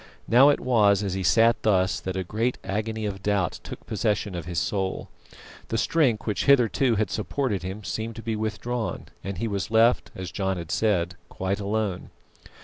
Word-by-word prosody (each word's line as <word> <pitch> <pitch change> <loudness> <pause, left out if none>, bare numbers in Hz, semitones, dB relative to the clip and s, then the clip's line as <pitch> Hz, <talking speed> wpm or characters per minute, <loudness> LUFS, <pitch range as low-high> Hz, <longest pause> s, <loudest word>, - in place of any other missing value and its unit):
Now 130 +5 +7
it 145 - +3
was 105 -5 +3
as 95 -2 -2
he 95 - -2
sat 115 +7 +4
thus 95 -3 +2
that 95 0 -4
a 95 - -1
great 110 +7 -1
agony 110 +2 -3
of 95 -2 -4
doubt 100 -3 0
took - - -9
possession 105 -2 -1
of 85 -3 -5
his 90 -1 -4
soul. 95 +5 -2 0.6
The 115 - -1
strength 125 -4 +2
which 105 - -1
hitherto 130 -2 +4
had 105 -2 0
supported 105 0 -1
him 95 +3 -6
seemed 110 +3 -4
to 115 - -8
be 115 -2 -2
withdrawn, 110 +2 -3
and 95 -1 -5
he 115 - -2
was 100 -3 -3
left, 115 +2 +3
as 95 -1 -6
John 95 -2 -1
had 85 -2 -6
said, 90 -5 +1
"quite 95 +2 -2
alone." 100 -2 -2
105 Hz, 185 wpm, -25 LUFS, 95-115 Hz, 0.6 s, Now